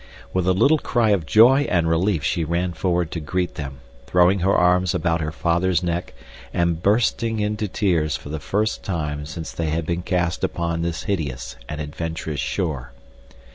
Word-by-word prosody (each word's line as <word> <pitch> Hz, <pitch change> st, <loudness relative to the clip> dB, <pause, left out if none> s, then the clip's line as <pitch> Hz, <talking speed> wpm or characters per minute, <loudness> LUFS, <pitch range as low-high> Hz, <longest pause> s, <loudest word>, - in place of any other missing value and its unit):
With 95 Hz, -1 st, 0 dB
a 95 Hz, -, +4 dB
little 145 Hz, +11 st, +4 dB
cry 115 Hz, -5 st, +1 dB
of 90 Hz, -6 st, +1 dB
joy 125 Hz, -, +6 dB
and 85 Hz, -2 st, +2 dB
relief 80 Hz, 0 st, +1 dB
she 80 Hz, -, 0 dB
ran 85 Hz, +3 st, -1 dB
forward 85 Hz, -1 st, 0 dB
to 85 Hz, -, -3 dB
greet 90 Hz, +4 st, -2 dB
them, 70 Hz, -3 st, -7 dB, 0.3 s
throwing 90 Hz, +5 st, +4 dB
her 95 Hz, +3 st, +2 dB
arms 90 Hz, 0 st, +3 dB
about 85 Hz, -2 st, 0 dB
her 75 Hz, 0 st, -2 dB
father's 85 Hz, +2 st, +1 dB
neck 85 Hz, 0 st, -3 dB, 0.4 s
and 85 Hz, -1 st, 0 dB
bursting 115 Hz, +2 st, +1 dB
into 105 Hz, 0 st, -1 dB
tears 85 Hz, -, +1 dB
for 70 Hz, -, -11 dB
the 80 Hz, +1 st, -4 dB
first 105 Hz, +8 st, -1 dB
time 75 Hz, -5 st, -3 dB
since 80 Hz, +1 st, -6 dB
they 80 Hz, -2 st, -2 dB
had 80 Hz, +1 st, -1 dB
been 85 Hz, +2 st, -1 dB
cast 90 Hz, -2 st, -1 dB
upon 85 Hz, -1 st, -1 dB
this 85 Hz, -1 st, -2 dB
hideous 70 Hz, -9 st, -3 dB
and 75 Hz, -, -4 dB
adventurous 80 Hz, 0 st, -4 dB
shore. 70 Hz, -4 st, -2 dB
85 Hz, 175 wpm, -22 LUFS, 80-95 Hz, 0.4 s, joy